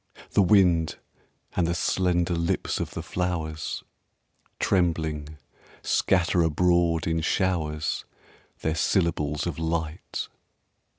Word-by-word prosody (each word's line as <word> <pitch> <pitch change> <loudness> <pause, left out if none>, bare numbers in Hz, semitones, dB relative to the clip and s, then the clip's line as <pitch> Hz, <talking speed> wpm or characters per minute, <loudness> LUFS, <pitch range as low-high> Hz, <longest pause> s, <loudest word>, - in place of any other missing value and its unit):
The - - +4
wind 90 -4 +4 0.6
and 85 -2 +2
the 85 - 0
slender 90 -1 +1
lips 85 0 -1
of - - -4
the - - -4
flowers, 80 -4 -3 0.8
Trembling, 80 -5 0 0.5
scatter 90 -1 +2
abroad 85 0 +2
in 80 0 0
showers 80 -4 0 0.6
Their 80 - 0
syllables 80 -4 +1
of 85 -3 -3
light. 80 -1 -3
85 Hz, 100 wpm, -26 LUFS, 80-90 Hz, 0.8 s, The